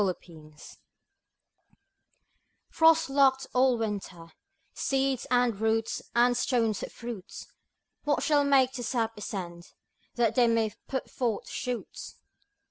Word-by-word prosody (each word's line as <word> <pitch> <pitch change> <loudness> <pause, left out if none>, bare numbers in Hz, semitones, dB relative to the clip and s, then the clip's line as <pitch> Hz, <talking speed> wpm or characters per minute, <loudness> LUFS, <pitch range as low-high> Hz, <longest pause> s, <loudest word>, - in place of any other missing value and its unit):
60 185 -3 0
SPRING 155 -3 -15 2.2
Frost 325 0 +4
locked 270 -1 +3
all 255 -1 +3
the 225 - 0
winter, 185 -5 -6 0.4
Seeds, 270 -2 -1
and 245 -4 +1
roots, 225 0 0
and 245 +1 +4
stones 230 -4 0
of - - -6
fruits, 235 -6 -8 0.6
What 295 -1 0
shall 295 -2 +3
make 270 -2 +3
their 250 -2 -5
sap 225 -2 -1
ascend 180 -4 -7 0.4
That 235 -2 +2
they 245 -2 +4
may 225 -2 +1
put 265 -1 -3
forth 235 -5 -2
shoots? 250 -2 -5
240 Hz, 125 wpm, -28 LUFS, 215-265 Hz, 2.2 s, Frost